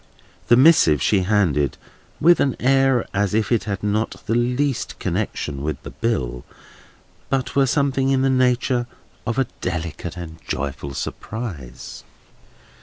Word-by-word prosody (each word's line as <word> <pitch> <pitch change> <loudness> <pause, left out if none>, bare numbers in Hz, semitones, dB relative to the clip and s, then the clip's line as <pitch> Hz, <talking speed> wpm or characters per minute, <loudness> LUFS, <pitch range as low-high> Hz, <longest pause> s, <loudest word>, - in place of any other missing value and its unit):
This 120 - +6
missive 130 - +6
she 100 +9 +2
handed 90 -8 +1 0.4
with 170 +3 +5
an 135 - +1
air 135 -1 +3
as 100 +1 0
if 110 +1 0
it 120 - +2
had 100 -2 -3
not 105 +2 -1
the - - 0
least 125 +3 0
connexion 70 -2 -3
with 75 -2 -3
the - - -8
bill, 65 - -2 0.9
but 130 -1 -1
were 135 -1 +4
something 135 -1 +1
in 135 -1 +2
the 135 - +3
nature 125 -1 +2 0.4
of 115 - -1
a 135 - +3 0.2
delicate 85 0 -4
and 80 -2 -8
joyful 70 0 -4
surprise. 85 - -6
110 Hz, 140 wpm, -22 LUFS, 80-130 Hz, 0.9 s, This